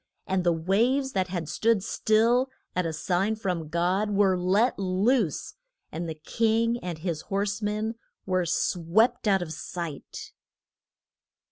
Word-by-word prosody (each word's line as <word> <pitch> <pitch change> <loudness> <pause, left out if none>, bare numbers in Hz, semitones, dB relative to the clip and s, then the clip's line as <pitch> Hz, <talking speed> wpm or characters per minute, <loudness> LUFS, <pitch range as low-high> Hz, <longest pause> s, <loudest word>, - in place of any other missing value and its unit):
And 190 -1 0
the 175 - +3
waves 230 +12 +1
that 190 -4 0
had 175 -4 -4
stood 225 +3 +1
still 230 +6 +2 0.3
at 180 -2 +1
a - - -2
sign 180 +6 0
from 180 -7 -3
God 180 +6 0
were 200 -2 +3
let 195 +8 +2
loose, 195 - +1 0.4
and 170 +1 -4
the 160 - -4
king 230 +8 +1
and 175 -3 -4
his 165 -1 -3
horse 200 +1 -1
men 215 +2 -1 0.3
were 185 -2 0
swept 180 +8 +1
out 195 -3 +3
of 160 -2 -6
sight. 170 -2 -7
190 Hz, 140 wpm, -27 LUFS, 175-220 Hz, 0.4 s, the